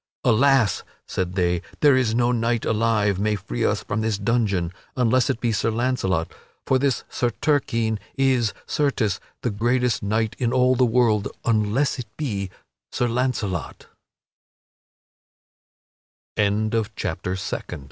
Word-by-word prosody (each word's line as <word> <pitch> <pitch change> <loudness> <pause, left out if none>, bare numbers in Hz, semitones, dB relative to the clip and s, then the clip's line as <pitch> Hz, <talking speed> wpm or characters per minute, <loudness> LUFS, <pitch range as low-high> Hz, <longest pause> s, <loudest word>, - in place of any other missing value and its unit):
"Alas," 130 0 +3 0.3
said 90 -1 -2
they, 90 -2 +1 0.2
"there 145 -3 +6
is 120 -4 +1
no 120 0 +3
knight 115 -1 0
alive 110 -3 +1
may 105 +1 +1
free - - -4
us - - +1
from 110 - -2
this 110 -2 0
dungeon, 100 -5 0 0.2
unless 125 0 +3
it - - 0
be 120 -2 0
Sir 110 +1 0
Launcelot. 110 -8 0 0.3
For 130 - +2
this 135 -2 0
Sir 120 - 0
Turquine 115 -7 +1 0.2
is, 130 -4 +2
certes, 130 -9 0 0.2
the 120 - 0
greatest 120 +3 +1
knight 110 +2 0
in 120 -2 +1
all 125 0 +4
the 125 0 +3
world, 115 -3 +2 0.2
unless 115 +5 +1
it 120 - -5
be 100 -10 -2 0.4
Sir 125 - 0
La 125 +3 +1
115 Hz, 125 wpm, -23 LUFS, 105-125 Hz, 0.4 s, there